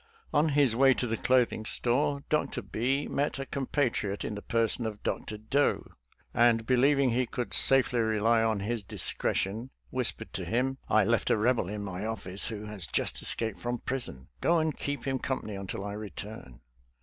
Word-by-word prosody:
On 150 +2 +4
his 140 -5 +3
way 135 +1 +5
to - - -1
the 115 -1 -1
clothing 125 -3 +2
store. 140 +5 0
Dr. 150 - 0
B 135 +6 -1
met 145 +1 -1
a 135 - -4
com 135 -1 -4
patriot 115 -8 0
ini - - -3
the 105 - -6
person 115 +1 0
of 105 -1 -7
Dr. 105 - -3
Doe,, 135 +7 0 0.4
and 115 -1 +4
believing 135 +1 +3
he 125 +1 +1
could 120 +1 -4
safely 130 -2 +4
rely 110 +1 +3
on 110 -3 +1
his 115 +2 -2
discretion, 100 +4 -1 0.2
(.whispered 115 -3 -1
to 95 - -3
him, 125 +8 -1
" - - -27
I 110 -1 +5
left 115 +2 +1
a - - +4
Eebel 110 -3 +1
in 105 -1 -4
my 95 -1 -5
office 100 -3 +1
who 105 -2 -5
has 105 -6 -6
just - - -1
escaped 110 -3 -3
from 120 0 -2
> - - -35
prison. 120 - -3
Go 170 - +3
and 155 -2 0
keep 145 -3 -4
him 135 -1 0
com 130 0 -2
pany 105 -2 -6
until 100 0 -5
I 100 - -4
return." 105 - -8
115 Hz, 195 wpm, -29 LUFS, 105-130 Hz, 0.4 s, way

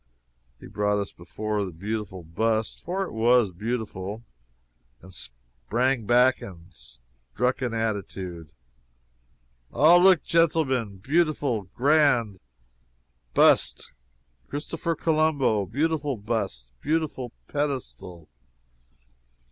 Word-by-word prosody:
He - - -12
brought 105 0 0
us 100 -1 -3
before 105 +4 -3
the 95 - -4
beautiful 100 +1 -5
bust 110 +7 -1
for 190 +3 -2
it 190 - -6
was 115 -2 +3
beautiful 105 0 -4 0.8
and 95 +1 -14
sprang 60 - -3
back 125 +2 +4
and 90 -1 -11
struck - - -4
an 120 -3 -2
attitude: 95 -7 -4 1.2
"Ah, 165 +4 +6
look, 180 -4 +6
genteelmen! 150 - +1
beautiful, 145 - 0
grand, 130 -7 +3 1.0
bust - - +3 0.6
Christopher 165 +3 -3
Colombo! 155 - +1
beautiful 145 - -1
bust, 100 - -3
beautiful 150 -6 -1 0.2
pedestal!" 90 - -4
115 Hz, 90 wpm, -26 LUFS, 95-145 Hz, 1.2 s, Ah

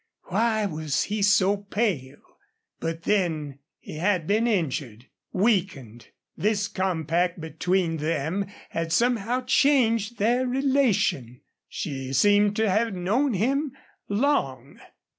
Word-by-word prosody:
Why 220 +2 +1
was 155 -6 -1
he 210 +1 -3
so 200 0 +4
pale? 195 - -4 0.4
But 165 0 -4
then 160 -9 -1 0.2
he - - -10
had 180 0 +1
been 215 +6 +1
injured 135 - -2 0.3
weakened. 180 - -1 0.3
This 210 0 0
compact 175 -2 -1
between 170 +1 -1
them 160 +5 -2 0.2
had 165 0 -3
somehow 240 +4 +1
changed 240 -5 +2
their 245 +5 +1
relation. 245 - +1 0.3
She 135 -3 -5
seemed 205 +7 +4
to 220 0 +1
have 215 +2 +1
known 220 +8 0
him 270 +7 0 0.4
long. 145 - -1
195 Hz, 110 wpm, -25 LUFS, 160-225 Hz, 0.4 s, so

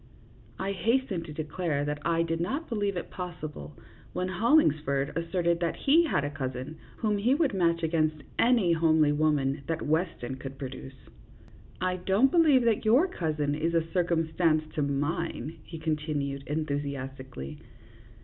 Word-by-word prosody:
I 195 +1 -2
hastened 220 -3 0
to - - -8
declare 150 -1 -2
that 145 0 -2
I 165 0 +2
did 165 0 -2
not 280 - -2
believe 205 -5 -1
it 175 - -5
possible, 155 - -7 0.4
when 180 - -1
Hollingsford 155 - +2
asserted 170 0 0
that 170 -1 -1
he 325 +5 +4
had 220 - +1
a 145 - -3
cousin 130 +1 -5 0.2
whom 210 -2 0
he 245 +7 +3
would 300 -5 +1
match 170 -3 +1
against 155 -2 0 0.2
any 230 -8 +4
homely 160 -2 +4
woman 145 -2 +1
that 165 0 -2
Weston 155 -5 -1
could 135 0 -8
produce. 135 0 -7 0.5
" - - -23 0.3
I 185 0 0
don't 195 +9 +3
believe 310 -7 +5
that 230 -2 +2
your 245 +11 +5
cousin 155 - -1
is 165 +3 -1
a 165 0 0
circum 170 -3 +1
stance 155 -2 +3
to 150 - -1
mine," 145 +3 -2
he 165 - -9
continued, 150 -3 -2
enthusiastically. 140 -2 -4
165 Hz, 155 wpm, -28 LUFS, 145-185 Hz, 0.5 s, believe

